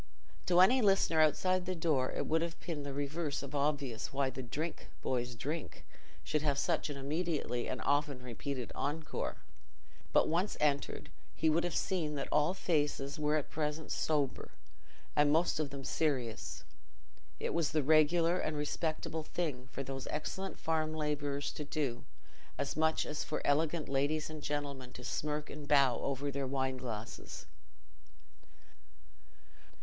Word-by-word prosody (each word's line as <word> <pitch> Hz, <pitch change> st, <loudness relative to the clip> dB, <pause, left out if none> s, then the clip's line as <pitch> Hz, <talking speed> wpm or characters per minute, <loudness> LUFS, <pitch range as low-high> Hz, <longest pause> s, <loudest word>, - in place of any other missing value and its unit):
To 180 Hz, 0 st, +6 dB
any 250 Hz, +8 st, +7 dB
listener 195 Hz, -6 st, +4 dB
outside 185 Hz, +4 st, +3 dB
the 185 Hz, -, 0 dB
door 155 Hz, -6 st, +1 dB
it -, -, -2 dB
would 160 Hz, +1 st, +2 dB
have 165 Hz, -1 st, -3 dB
been 160 Hz, -4 st, -4 dB
the 140 Hz, 0 st, -4 dB
reverse 145 Hz, +2 st, -2 dB
of 140 Hz, -, -7 dB
obvious 140 Hz, -5 st, 0 dB
why 135 Hz, -1 st, +1 dB
the 130 Hz, +1 st, -5 dB
"Drink, 150 Hz, +7 st, -4 dB
boys, 125 Hz, -1 st, -1 dB
drink!" 145 Hz, -, -4 dB, 0.4 s
should 150 Hz, -, 0 dB
have 145 Hz, -2 st, +1 dB
such 140 Hz, -, +1 dB
an 145 Hz, -, -4 dB
immediate 155 Hz, +4 st, -1 dB, 0.2 s
and 130 Hz, -, -2 dB
often 145 Hz, -3 st, +1 dB
repeated 125 Hz, +1 st, -4 dB
encore; 155 Hz, +3 st, -2 dB, 0.7 s
but -, -, +5 dB
once 175 Hz, +6 st, +1 dB
entered, 140 Hz, -2 st, 0 dB, 0.2 s
he 160 Hz, 0 st, +3 dB
would 165 Hz, +2 st, +3 dB
have 175 Hz, -, -1 dB
seen 165 Hz, -6 st, 0 dB
that 140 Hz, -, -2 dB
all 150 Hz, +5 st, +3 dB
faces 145 Hz, -4 st, 0 dB
were 150 Hz, 0 st, +2 dB
at 150 Hz, -, -1 dB
present 150 Hz, 0 st, -2 dB
sober, 145 Hz, -4 st, 0 dB, 0.7 s
and 145 Hz, 0 st, +5 dB
most 160 Hz, +1 st, +3 dB
of 150 Hz, -2 st, 0 dB
them 140 Hz, 0 st, -7 dB
serious—it 130 Hz, -8 st, -4 dB
was 165 Hz, -3 st, +2 dB
the 155 Hz, -2 st, +2 dB
regular 165 Hz, +4 st, +5 dB
and 155 Hz, -1 st, -1 dB
respectable 155 Hz, +2 st, -1 dB
thing 150 Hz, -7 st, -3 dB
for 135 Hz, -, -4 dB
those 135 Hz, 0 st, -5 dB
excellent 190 Hz, +5 st, -3 dB
farm 155 Hz, -1 st, 0 dB
labourers 145 Hz, -2 st, -1 dB
to 150 Hz, -, -5 dB
do, 140 Hz, -5 st, -2 dB, 0.5 s
as -, -, -2 dB
much 160 Hz, +1 st, +2 dB
as 150 Hz, -, -3 dB
for -, -, -2 dB
elegant 155 Hz, +2 st, +2 dB
ladies 145 Hz, +3 st, +1 dB
and 155 Hz, -1 st, -6 dB
gentlemen 140 Hz, -3 st, -3 dB
to 125 Hz, -, -9 dB
smirk 150 Hz, +3 st, -2 dB
and 150 Hz, -1 st, -7 dB
bow 140 Hz, -4 st, +5 dB
over 140 Hz, +1 st, -1 dB
their 140 Hz, -1 st, -2 dB
wine 130 Hz, -1 st, 0 dB
glasses. 115 Hz, -3 st, -6 dB
150 Hz, 155 wpm, -34 LUFS, 140-160 Hz, 0.7 s, any